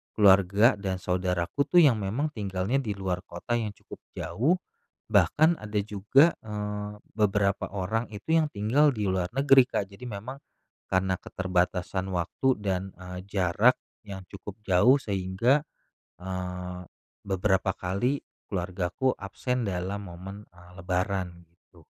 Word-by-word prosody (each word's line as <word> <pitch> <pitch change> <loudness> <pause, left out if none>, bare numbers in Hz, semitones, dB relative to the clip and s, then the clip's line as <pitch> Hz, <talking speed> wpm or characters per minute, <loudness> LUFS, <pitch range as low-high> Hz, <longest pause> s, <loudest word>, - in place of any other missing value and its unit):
keluarga 100 +3 +5
dan 95 -2 -2
saudaraku 90 +8 -1
tuh 175 +3 +6
yang 120 -7 +5
memang 120 +11 -1
tinggalnya 100 +1 -1
di 110 -7 -3
luar 95 -2 -2
kota 90 +8 -3
yang 105 -2 -3
cukup - - -12 0.2
jauh, 140 - +1 0.6
bahkan 110 - +4
ada 110 0 -8
juga, 110 - +3
eee, 105 -1 -4 0.2
beberapa 105 -2 +1
orang 110 +5 -1
itu 105 +9 -6
yang 155 - +1
tinggal 120 +9 +3
di 105 - -2
luar 95 -1 0
negeri, 135 -1 +6
Kak. 100 -6 -2
Jadi 125 +6 -9
memang 120 +6 -7 0.5
karena 95 0 +2
keterbatasan 95 0 -1
waktu 90 +9 -1 0.2
dan, 95 -1 -1
eee, 90 +1 -9
jarak 100 +5 +3 0.3
yang 95 -1 -7
cukup 100 0 -8
jauh, 105 +8 +5
sehingga, 100 +6 +1 0.6
eee, 90 -1 -5 0.4
beberapa 95 -1 +1
kali 110 +10 -1 0.3
keluargaku 95 +6 -1
absen 125 +5 -2
dalam 95 +2 -3
momen, 95 +4 -9
eee, 90 0 -17
lebaran, 90 -1 -2
gitu. 85 -1 -24
100 Hz, 130 wpm, -27 LUFS, 90-110 Hz, 0.6 s, tuh